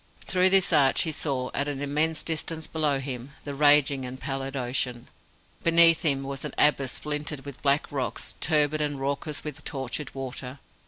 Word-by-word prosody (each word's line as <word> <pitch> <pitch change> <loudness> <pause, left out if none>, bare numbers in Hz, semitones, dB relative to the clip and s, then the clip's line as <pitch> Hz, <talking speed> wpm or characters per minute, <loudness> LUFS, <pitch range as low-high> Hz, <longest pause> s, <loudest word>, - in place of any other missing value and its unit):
Through 185 0 +4
this 190 -1 +4
arch 135 -2 +4
he 160 - -1
saw, 135 -4 -2
at 140 - -1
an 145 -2 -3
immense 150 +3 0
distance 160 0 -1
below 150 -3 0
him, 130 0 -6
the 145 - -5
raging 145 -1 +4
and 130 +1 -7
pallid 135 0 -4
ocean. 125 -1 -2 0.5
Beneath 165 -1 +5
him 140 -4 +1
was 135 0 -4
an - - -5
abyss 140 -3 +3
splintered 150 -2 -3
with 140 -3 -8
black 140 +1 +1
rocks, 135 -3 -3
turbid 155 -1 +2
and 145 -2 -2
raucous 140 +2 -3
with 150 - -7
tortured 135 0 -5
water. 130 0 -6
140 Hz, 170 wpm, -26 LUFS, 135-150 Hz, 0.5 s, Beneath